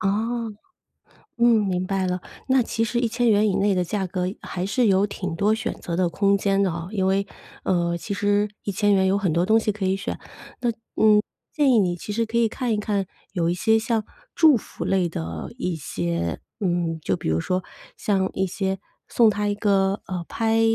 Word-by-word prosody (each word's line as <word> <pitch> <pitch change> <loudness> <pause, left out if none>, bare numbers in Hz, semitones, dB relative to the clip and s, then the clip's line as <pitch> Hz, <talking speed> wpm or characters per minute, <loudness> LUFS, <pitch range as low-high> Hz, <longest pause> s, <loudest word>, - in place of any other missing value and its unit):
哦， 220 +3 -1 0.9
嗯， 235 -3 +5
明 185 -1 -1
白 190 -1 0
了。 180 0 -1 0.3
那 260 -1 +4
其 225 0 -1
实 235 +1 -1
￥1000 230 -3 +3
以 195 - +1
内 200 0 +2
的 180 - +1
价 190 +2 -2
格， 180 0 -2 0.2
还 185 0 -4
是 240 +4 +2
有 195 0 +4
挺 185 -4 -4
多 205 +5 +3
选 225 +2 -3
择 170 - -5
的 180 -1 +2
空 200 +3 +2
间 195 0 +1
的 190 - +2
哦。 170 +1 -5
因 190 -3 0
为， 195 +1 +1 0.4
呃， 170 -1 +1
其 170 +4 -5
实 205 +1 +1 0.2
￥1000 200 -1 +2
有 190 - +3
很 195 -5 0
多 170 +3 +2
东 220 +2 +5
西 215 -1 0
可 200 -1 -4
以 190 +1 +1
选。 195 - -4 0.4
那 240 -1 +1 0.3
嗯， 215 -1 +5 0.3
建 290 -3 +3
议 235 - +5
你 180 -4 +2
其 205 +4 -6
实 230 +2 0
可 225 +1 -4
以 235 -1 +4
看 240 +2 -2
一 - - +1
看， 205 -2 -1 0.3
有 170 -4 0
一 175 - +1
些 220 +5 +3
像 225 -1 0 0.3
祝 315 -6 +6
福 - - -6
类 190 -2 +1
的 80 - -5
一 180 -2 -2
些， 85 - -3 0.2
嗯， 175 -4 0
就 95 -10 0
比 - - -5
如 80 +1 +1
说 185 - -1 0.3
像 190 -2 +1
一 190 - +1
些 190 +1 -2 0.3
送 230 -2 +5
她 205 0 -1
一 205 - 0
个， 200 -1 +1
呃， 180 -2 -3
拍 225 0 +1
200 Hz, 215 characters per minute, -24 LUFS, 180-220 Hz, 0.9 s, 祝